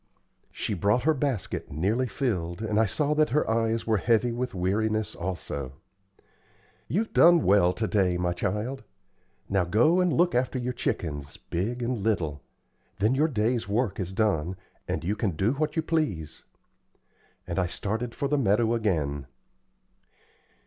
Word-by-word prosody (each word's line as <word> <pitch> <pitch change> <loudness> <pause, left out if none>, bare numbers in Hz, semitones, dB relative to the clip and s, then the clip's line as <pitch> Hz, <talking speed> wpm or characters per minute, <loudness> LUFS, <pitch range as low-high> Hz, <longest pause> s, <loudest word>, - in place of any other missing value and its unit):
She - - -3
brought 105 +6 +1
her 160 +3 +4
basket, 135 -8 -2
nearly 105 - 0
filled, 95 -11 -2
and 110 -1 0
I 110 - +4
saw 150 +9 0
that 155 0 +3
her 150 +5 +1
eyes 115 0 0
were 110 -1 +2
heavy 115 +3 +2
with 120 -1 -3
weariness 110 +4 0
also. 85 -7 -5 1.1
"You've 220 +5 -1
done 170 -1 +6
well 95 -2 +4
to 110 +2 -2
day, 90 -2 +2
my 90 0 0
child. 105 +9 -3 0.6
Now 95 -2 +2
go 120 - +3
and 180 -1 +3
look 175 +2 +3
after 125 +1 0
your 125 0 -2
chickens, 75 - -3
big 115 +8 -3
and 120 -1 -1
little. 85 -9 -1 0.6
Then 110 +5 +2
your 150 +4 +3
day's 115 - 0
work 110 0 0
is 95 -1 -3
done, 95 -4 0 0.3
and 80 - -2
you 100 +5 0
can 100 -6 -1
do 95 +8 +2
what 150 +2 -1
you 160 - +1
please;" 150 - -2 1.0
and 85 - -2
I 90 - +1
started 110 +6 -3
for 140 - -1
the 145 +1 +1
meadow 110 0 +2
again. 75 - -1
110 Hz, 155 wpm, -27 LUFS, 90-125 Hz, 1.1 s, done